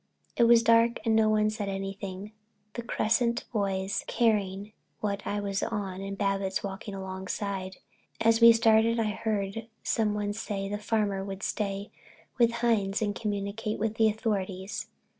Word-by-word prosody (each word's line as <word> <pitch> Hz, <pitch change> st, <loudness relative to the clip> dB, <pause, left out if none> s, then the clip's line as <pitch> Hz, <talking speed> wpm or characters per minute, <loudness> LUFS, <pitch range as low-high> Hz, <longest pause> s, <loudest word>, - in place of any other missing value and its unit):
It 235 Hz, -, +4 dB
was 230 Hz, 0 st, +6 dB
dark 230 Hz, +1 st, +4 dB
and 225 Hz, -1 st, +3 dB
no 220 Hz, -1 st, +4 dB
one 215 Hz, 0 st, +3 dB
said 210 Hz, -2 st, -3 dB
anything, 195 Hz, +1 st, -5 dB, 0.4 s
the 235 Hz, -, -4 dB
Cresset 235 Hz, +1 st, +1 dB
boys 195 Hz, -2 st, -1 dB
carrying 205 Hz, -3 st, 0 dB, 0.3 s
what 200 Hz, -1 st, -3 dB
I 205 Hz, -, -1 dB
was 200 Hz, -1 st, -2 dB
on 200 Hz, -4 st, -3 dB
and 195 Hz, 0 st, -5 dB
Babbitts 195 Hz, -1 st, -1 dB
walking 200 Hz, +1 st, -5 dB
alongside. 190 Hz, 0 st, -4 dB, 0.4 s
As 225 Hz, 0 st, +3 dB
we 230 Hz, 0 st, +10 dB
started 225 Hz, 0 st, +4 dB
I 215 Hz, -2 st, +1 dB
heard 210 Hz, 0 st, -2 dB, 0.2 s
someone 210 Hz, -2 st, 0 dB
say 205 Hz, -2 st, -3 dB
the 205 Hz, +1 st, -3 dB
Farmer 210 Hz, -3 st, 0 dB
would 195 Hz, 0 st, -6 dB
stay 200 Hz, -1 st, -2 dB, 0.5 s
with 235 Hz, -1 st, +5 dB
Hines 205 Hz, -3 st, +1 dB
and 205 Hz, -1 st, 0 dB
"communicate 210 Hz, +1 st, -3 dB
with 220 Hz, 0 st, -2 dB
the 220 Hz, -1 st, +5 dB
authorities." 200 Hz, -3 st, -3 dB
205 Hz, 150 wpm, -28 LUFS, 195-225 Hz, 0.5 s, we